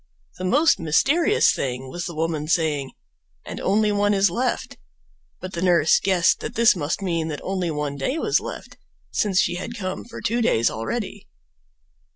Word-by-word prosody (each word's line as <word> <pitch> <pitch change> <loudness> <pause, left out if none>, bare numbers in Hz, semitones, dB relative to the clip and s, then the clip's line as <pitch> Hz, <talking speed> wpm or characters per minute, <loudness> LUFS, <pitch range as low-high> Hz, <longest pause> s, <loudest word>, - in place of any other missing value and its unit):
The 185 - -3
most 285 - +3
mysterious 285 - +3
thing 130 0 -3
was 175 +6 -5
the 170 - -7
woman 155 -1 -2
saying 155 -5 0 0.5
"and - - -7
only 210 +2 +2
one 205 0 +2
is 195 +1 +3
left"; 250 +1 -2 0.6
but 185 0 -7
the 170 - -3
nurse 175 -4 +4
guessed 185 -3 +2
that - - -6
this 230 -1 +5
must 165 +3 -3
mean 165 -4 -1
that 150 -2 -4
only 185 -2 -2
one 150 -2 -3
day 200 - -1
was 425 +5 +2
left, - - -8 0.3
since 195 -3 +1
she 175 0 +1
had 230 +6 -6
come 185 -3 -4
for 235 - -9
two 235 +3 -1
days 115 - +2
already. 205 - -5
185 Hz, 175 wpm, -23 LUFS, 160-210 Hz, 0.6 s, this